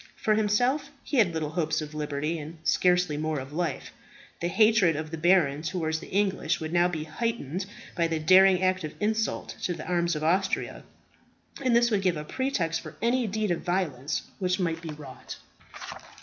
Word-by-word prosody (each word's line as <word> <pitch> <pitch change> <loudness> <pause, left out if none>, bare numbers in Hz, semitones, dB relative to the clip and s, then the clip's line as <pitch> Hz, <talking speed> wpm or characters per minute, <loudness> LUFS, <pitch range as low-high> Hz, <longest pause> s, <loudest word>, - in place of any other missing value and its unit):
For 215 - +1
himself, 245 +7 +1
he 285 - -2
had 210 -7 +4
little 155 -2 -3
hopes 155 -2 0
of 155 -1 -6
liberty, 150 +2 -2
and 155 +2 -8
scarcely 180 -3 +2
more 155 -1 -1
of 135 +2 -8
life. 165 -3 -3 0.5
The 170 - -1
hatred 215 -3 +4
of 155 +1 -5
the 165 - -4
baron 155 -4 +3
towards 160 -1 -2
the - - -11
English 190 -5 0
would 160 +1 -5
now 175 0 +4
be 160 -4 -3
heightened 185 - -3 0.3
by 170 -1 +2
the 165 -1 -1
daring 185 +3 +6
act 185 -1 +1
of 155 - -6
insult 220 +1 -1
to 175 - -1
the 155 - -8
arms 175 -1 0
of 150 - -3
Austria, 185 +5 0 0.8
and 250 -2 +3
this 235 0 +4
would 205 -2 +2
give 180 -4 +1
a 150 - -4
pretext 165 - -1
for - - -10
any 235 +2 +1
deed 215 -1 -1
of 170 - -1
violence 155 -6 -1 0.2
which 185 0 0
might 165 -2 -1
be 165 - -7
wrought. 145 -4 -9
175 Hz, 190 wpm, -27 LUFS, 155-195 Hz, 0.8 s, daring